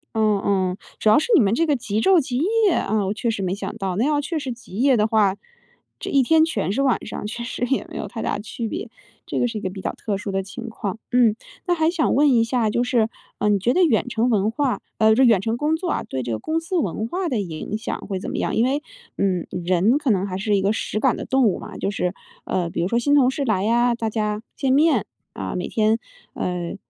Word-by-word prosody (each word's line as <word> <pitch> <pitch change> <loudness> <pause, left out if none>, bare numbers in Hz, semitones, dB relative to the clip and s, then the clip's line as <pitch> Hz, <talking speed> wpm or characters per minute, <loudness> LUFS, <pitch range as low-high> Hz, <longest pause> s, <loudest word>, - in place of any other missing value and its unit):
嗯 215 -2 +2
嗯， 185 -2 +1 0.2
主 215 - +3
要 215 - +6
是 315 - 0
你 360 - +7
们 200 -1 +2
这 330 - +2
个 300 -3 +2
极 215 -4 -2
昼 360 +8 +5
极 255 -3 -3
夜 415 - +2
啊， 215 -7 0
我 195 - 0
确 230 +2 -2
实 210 - -3
没 185 0 -1
想 205 - -5
到。 190 -4 -2
那 220 +7 +1
要 295 0 +2
确 325 +3 -3
实 275 -4 -3
极 235 -5 -10
夜 265 +2 +4
的 215 -1 +2
话， 210 -3 +3 0.6
这 - - -5
一 275 - +5
天 315 +5 +4
全 210 - -2
是 270 +7 0
晚 260 -3 +1
上， - - -6
确 235 +3 -5
实 245 0 -3
也 270 +2 0
没 - - -7
有 - - -4
太 - - -6
大 - - -1
区 225 +2 -5
别。 340 - -5 0.4
这 - - -3
个 245 - +2
是 230 -2 -4
一 - - -5
个 185 - -3
比 190 0 -8
较 - - -2
特 210 -3 -3
殊 200 0 -5
的 195 0 -1
情 235 +4 -8
况。 215 -1 -5
嗯， 240 -4 +4 0.3
那 355 - +2
还 320 -2 +2
想 340 -2 +1
问 290 +1 +4
一 235 -3 +4
下 230 -1 +1
就 240 +3 +1
是， 235 -3 +1 0.3
呃， 210 - +2
你 205 - +4
觉 230 +6 +1
得 370 - +4
远 255 -8 +2
程 235 0 0
文 215 -2 +2
化 260 +1 -1 0.2
呃， 220 0 +5
这 260 - +4
远 225 -7 +5
程 225 +3 -1
工 300 +4 +1
作 350 +2 -3
啊， - - -1
对 130 - -4
这 120 -1 -4
个 110 - -1
公 315 - -1
司 335 +3 -3
文 220 - -1
化 360 +8 -2
的 250 -8 -1
影 180 +4 -5
响 - - -3
会 195 -2 -3
怎 - - -5
么 - - -4
样？ - - -1
因 230 - +3
为， 280 +3 0 0.3
嗯， 185 -3 0
人 180 +7 +2
可 295 -5 +1
能 195 -1 +1
还 185 -1 -4
是 210 +1 +1
一 195 - +2
个 195 +1 +2
实 215 - -2
感 260 +1 +2
的 - - -5
动 265 -1 +2
物 195 - +1
嘛， - - -9
就 - - -1
是 180 -3 -1 0.3
呃， 175 -2 -1
比 - - -3
如 - - +1
说 235 +4 +1
新 285 +4 +2
同 260 -3 +5
事 275 +1 -2
来 205 -6 +1
呀， 240 +2 +3
大 225 -2 -3
家 210 0 -2
见 270 - 0
面， 290 - +3 0.3
啊， 95 -1 -5
每 180 - -3
天 220 0 +2 0.4
呃， 175 -1 -3
225 Hz, 290 characters per minute, -22 LUFS, 200-270 Hz, 0.6 s, 你